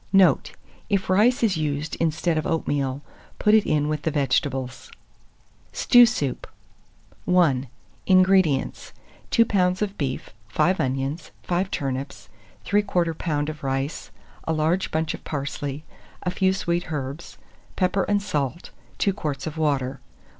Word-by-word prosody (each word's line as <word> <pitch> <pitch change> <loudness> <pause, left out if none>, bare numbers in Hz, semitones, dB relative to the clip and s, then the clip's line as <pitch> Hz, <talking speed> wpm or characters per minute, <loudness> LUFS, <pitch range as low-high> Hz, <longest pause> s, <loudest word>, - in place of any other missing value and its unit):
Note. 175 -6 +4 0.4
If 195 -2 0
rice 230 +6 +4
is 200 -7 +2
used 150 0 -2
instead 165 +1 0
of 155 - -1
oatmeal, 140 -4 -1 0.3
put 210 - +3
it 220 -1 +5
in 150 -1 +2
with 150 -1 -2
the 160 - 0
vegetables. 135 -3 -1 0.8
STEW 245 -1 +6
SOUP. 145 - -2 0.8
I. - - 0
186. 140 -9 +3 0.3
INGREDIENTS. 185 -6 +3 0.4
2 230 - +4
lbs. 185 -3 +1
of 205 -1 -4
beef, 135 -3 -3 0.2
5 180 - +1
onions, 135 +4 -2
5 180 +2 -1
turnips, 135 -2 -4 0.4
3/4 180 -5 +1
lb. 150 -2 -2
of 155 -1 -8
rice, 135 +3 -2 0.4
a 160 - 0
large 160 +4 +1
bunch 160 0 -1
of - - -9
parsley, 145 0 -4 0.4
a 180 - -1
few 190 +1 +2
sweet 175 -3 -2
herbs, 140 +2 -5 0.4
pepper 190 +1 +1
and 205 -1 +1
salt, 150 -4 -3 0.3
2 200 - +1
quarts 145 -8 -4
of 160 -1 -5
water. 140 -4 -1
160 Hz, 140 wpm, -24 LUFS, 140-185 Hz, 0.8 s, STEW